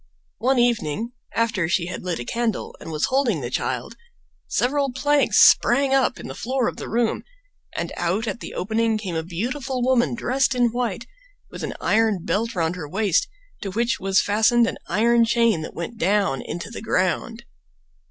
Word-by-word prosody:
One 260 Hz, +4 st, +2 dB
evening. 235 Hz, -3 st, +1 dB, 0.2 s
after 215 Hz, -7 st, +1 dB
she 175 Hz, -1 st, +1 dB
had 180 Hz, +1 st, -6 dB
lit 180 Hz, -2 st, -2 dB
a 120 Hz, -, -6 dB
candle 230 Hz, -, -2 dB
and 165 Hz, -, -8 dB
was 155 Hz, 0 st, 0 dB
holding 255 Hz, -, +1 dB
the 120 Hz, -1 st, -5 dB
child, -, -, -3 dB, 0.5 s
several 275 Hz, +1 st, +1 dB
planks 290 Hz, +3 st, +2 dB
sprang 275 Hz, -1 st, +4 dB
up 270 Hz, -2 st, +2 dB
in -, -, -7 dB
the -, -, -6 dB
floor 255 Hz, 0 st, -1 dB
of -, -, -4 dB
the -, -, -6 dB
room, 230 Hz, 0 st, 0 dB, 0.5 s
and -, -, -3 dB
out 185 Hz, +6 st, 0 dB
at 230 Hz, -, -3 dB
the -, -, -8 dB
opening 225 Hz, +2 st, 0 dB
came 195 Hz, -5 st, -5 dB
a 160 Hz, -, -1 dB
beautiful 245 Hz, -, -3 dB
woman 250 Hz, -2 st, +2 dB
dressed 260 Hz, +2 st, +1 dB
in 245 Hz, -2 st, +3 dB
white, 235 Hz, -2 st, -2 dB, 0.5 s
with -, -, -8 dB
an -, -, -4 dB
iron 215 Hz, -5 st, +1 dB
belt 225 Hz, +3 st, -1 dB
round 165 Hz, 0 st, 0 dB
her 150 Hz, -4 st, -6 dB
waist, 195 Hz, -1 st, +1 dB, 0.3 s
to 195 Hz, -, -4 dB
which 230 Hz, +4 st, 0 dB
was 195 Hz, 0 st, +2 dB
fastened 220 Hz, +3 st, +3 dB
an -, -, -4 dB
iron 235 Hz, +5 st, +3 dB
chain 230 Hz, -6 st, +2 dB
that 155 Hz, -, -7 dB
went 195 Hz, +7 st, -6 dB
down 195 Hz, -6 st, +1 dB
into 170 Hz, +7 st, -6 dB
the -, -, -7 dB
ground. 220 Hz, +3 st, -1 dB
225 Hz, 180 wpm, -23 LUFS, 185-240 Hz, 0.5 s, sprang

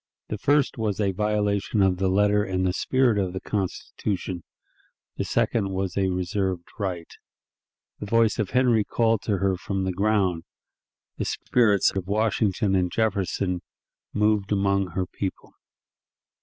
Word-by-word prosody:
The 105 Hz, -, -4 dB
first 145 Hz, 0 st, +2 dB
was 105 Hz, -3 st, -1 dB
a 100 Hz, -2 st, +2 dB
violation 105 Hz, 0 st, 0 dB
of 95 Hz, -1 st, +2 dB
the 95 Hz, +1 st, +1 dB
letter 105 Hz, +2 st, +3 dB
and 95 Hz, -2 st, -1 dB
the 90 Hz, -, +1 dB
spirit 125 Hz, -1 st, +2 dB
of 95 Hz, -2 st, -1 dB
the 95 Hz, -, -3 dB
Constitution; 95 Hz, -2 st, -3 dB, 0.8 s
the -, -, 0 dB
second 100 Hz, -4 st, 0 dB
was 95 Hz, -1 st, -2 dB
a 95 Hz, -1 st, +2 dB
reserved 90 Hz, 0 st, -2 dB
right. 90 Hz, -4 st, -2 dB, 0.9 s
The 105 Hz, -, -6 dB
voice 115 Hz, +1 st, +2 dB
of 105 Hz, -, 0 dB
Henry 125 Hz, -4 st, +3 dB
called 115 Hz, 0 st, +1 dB
to 100 Hz, -3 st, +1 dB
her 95 Hz, 0 st, +1 dB
from 95 Hz, +1 st, -3 dB
the 95 Hz, -1 st, -1 dB
ground; 95 Hz, -3 st, +1 dB, 0.8 s
the -, -, -2 dB
spirits 105 Hz, -6 st, +2 dB
of 95 Hz, -2 st, -3 dB
Washington 105 Hz, -1 st, +1 dB
and 90 Hz, -2 st, +1 dB
Jefferson 95 Hz, -4 st, 0 dB, 0.5 s
moved 105 Hz, -1 st, +1 dB
among 100 Hz, -1 st, +2 dB
her 95 Hz, 0 st, -1 dB
people. 95 Hz, +1 st, -6 dB
100 Hz, 145 wpm, -25 LUFS, 95-105 Hz, 0.9 s, letter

